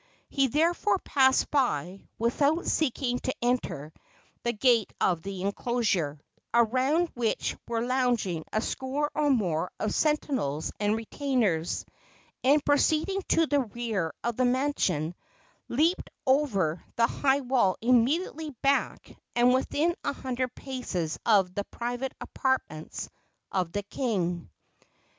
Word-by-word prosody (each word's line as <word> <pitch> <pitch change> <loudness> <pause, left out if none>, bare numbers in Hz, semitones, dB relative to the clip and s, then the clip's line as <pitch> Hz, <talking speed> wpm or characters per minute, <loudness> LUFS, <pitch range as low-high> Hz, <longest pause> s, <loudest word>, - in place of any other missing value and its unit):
He 275 -1 +2
therefore 335 - +2
passed 265 -6 +3
by, 195 - 0
without 285 +8 +1
seeking 255 -4 0
to 260 - -3
enter, 235 - -1 0.5
the 235 - 0
gate 235 -2 +3
of 175 -3 +2
the 195 0 -5
enclosure, 200 -8 0 0.3
around 260 +9 +3
which 235 -2 -1
were 230 0 -1
lounging 245 -10 0
a 215 - +1
score 275 +5 -2
or 300 -1 +1
more 180 - +1
of 215 - -1
sentinels 270 - 0
and 210 +1 +2
retainers, 225 - -1 0.6
and, 280 +3 +4
proceeding 315 +6 +2
to 330 - +4
the 290 -2 +2
rear 220 -8 -2
of 235 -1 -2
the 255 - +3
mansion, 245 - +1 0.5
leaped 320 +8 +1 0.2
over 210 - +2
the 230 - +4
high 275 +3 +1
wall 245 -8 +2
immediately 280 - +2
back 275 0 0 0.2
and 245 +1 +5
within 300 +6 +1
a - - -1
hundred 255 -2 -3
paces 200 - -4
of 195 -5 +4
the 205 - -2
private 245 +2 -4
apartments 260 - -2 0.4
of 180 -3 -1
the 205 +2 -2
king. 185 - -2
245 Hz, 125 wpm, -28 LUFS, 195-275 Hz, 0.6 s, and